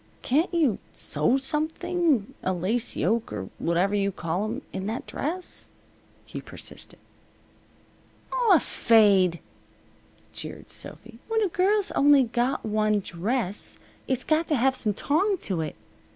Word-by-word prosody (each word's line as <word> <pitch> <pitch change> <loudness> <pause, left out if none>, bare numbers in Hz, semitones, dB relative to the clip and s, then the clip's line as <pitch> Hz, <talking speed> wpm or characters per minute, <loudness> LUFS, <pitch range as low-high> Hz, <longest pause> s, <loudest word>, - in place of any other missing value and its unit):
"Can't 305 +8 +2
you 310 - +2
sew 155 - +1
something 310 - 0
a 185 - 0
lace 215 +7 0
yoke 220 +8 0
or 95 -3 -5
whatever 175 +4 +1
you 200 -1 +1
call 175 +2 -2
'em 240 +6 -4
in 190 +1 -3
that 225 +3 -3
dress?" 355 +5 -1 0.6
he - - -7
persisted. - - -10 1.4
"Aw, 475 -7 +5
fade!" 200 - +4 0.9
jeered - - -8
Sophy. 230 0 -8
"When 450 -1 +1
a 400 - +1
girl's 390 +4 +2
only 285 -1 +5
got 245 +2 -1
one 215 -1 +1
dress 200 +3 -2 0.3
it's 260 -1 -1
got 315 +1 +1
to 305 - +2
have 265 +1 +2
some 210 -5 -1
tong 380 - +1
to 180 -5 -2
it. 155 - -4
235 Hz, 135 wpm, -26 LUFS, 195-310 Hz, 1.4 s, Aw